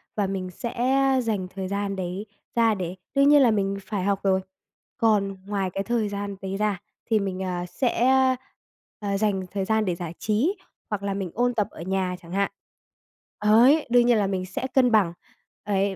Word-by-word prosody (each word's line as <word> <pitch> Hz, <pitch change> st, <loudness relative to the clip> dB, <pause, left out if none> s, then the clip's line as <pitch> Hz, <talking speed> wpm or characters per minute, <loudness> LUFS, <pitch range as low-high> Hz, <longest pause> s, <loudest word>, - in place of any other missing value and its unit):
và 205 Hz, -2 st, +1 dB
mình 190 Hz, -1 st, -3 dB
sẽ 235 Hz, +6 st, -5 dB, 0.5 s
dành 210 Hz, -5 st, -1 dB
thời 190 Hz, -1 st, -3 dB
gian 200 Hz, 0 st, -2 dB
đấy 185 Hz, +2 st, -4 dB, 0.3 s
ra 230 Hz, -2 st, +4 dB
để 180 Hz, -3 st, -4 dB, 0.2 s
đương 275 Hz, +1 st, +5 dB
nhiên 295 Hz, -1 st, +7 dB
là 245 Hz, -4 st, +5 dB
mình 200 Hz, -2 st, 0 dB
phải 195 Hz, 0 st, -3 dB
học 200 Hz, 0 st, +1 dB
rồi. 190 Hz, -1 st, +2 dB, 0.6 s
Còn 200 Hz, -3 st, +2 dB
ngoài 200 Hz, -2 st, -1 dB
cái 195 Hz, -, -2 dB
thời 230 Hz, -1 st, 0 dB
gian 200 Hz, 0 st, -4 dB
đấy 195 Hz, 0 st, -3 dB
ra 205 Hz, -2 st, 0 dB, 0.2 s
thì 220 Hz, -2 st, +2 dB
mình, 190 Hz, -1 st, -3 dB
à, 180 Hz, -1 st, -3 dB
sẽ, 240 Hz, +5 st, 0 dB, 0.9 s
à, 200 Hz, -1 st, -1 dB
dành 200 Hz, -2 st, 0 dB
thời 195 Hz, -1 st, -2 dB
gian 220 Hz, +1 st, +1 dB
để 180 Hz, -3 st, 0 dB
giải 170 Hz, -1 st, -6 dB
trí, 230 Hz, -, +1 dB, 0.3 s
hoặc 205 Hz, -2 st, -3 dB
là 200 Hz, 0 st, -1 dB
mình 195 Hz, -3 st, -4 dB
ôn 245 Hz, +1 st, +1 dB
tập 210 Hz, -4 st, 0 dB
ở -, -, -10 dB
nhà 185 Hz, 0 st, -1 dB
chẳng 170 Hz, -, -14 dB
hạn, 200 Hz, +1 st, 0 dB, 0.9 s
đấy, 245 Hz, +9 st, +6 dB
đương 245 Hz, 0 st, +5 dB
nhiên 240 Hz, -1 st, +4 dB
là 205 Hz, -2 st, +2 dB
mình 190 Hz, -1 st, -2 dB
sẽ 185 Hz, +8 st, -4 dB
cân 255 Hz, -2 st, +4 dB
bằng. 200 Hz, -6 st, +3 dB, 0.5 s
Ấy, 200 Hz, -1 st, 0 dB
200 Hz, 195 wpm, -25 LUFS, 190-220 Hz, 0.9 s, nhiên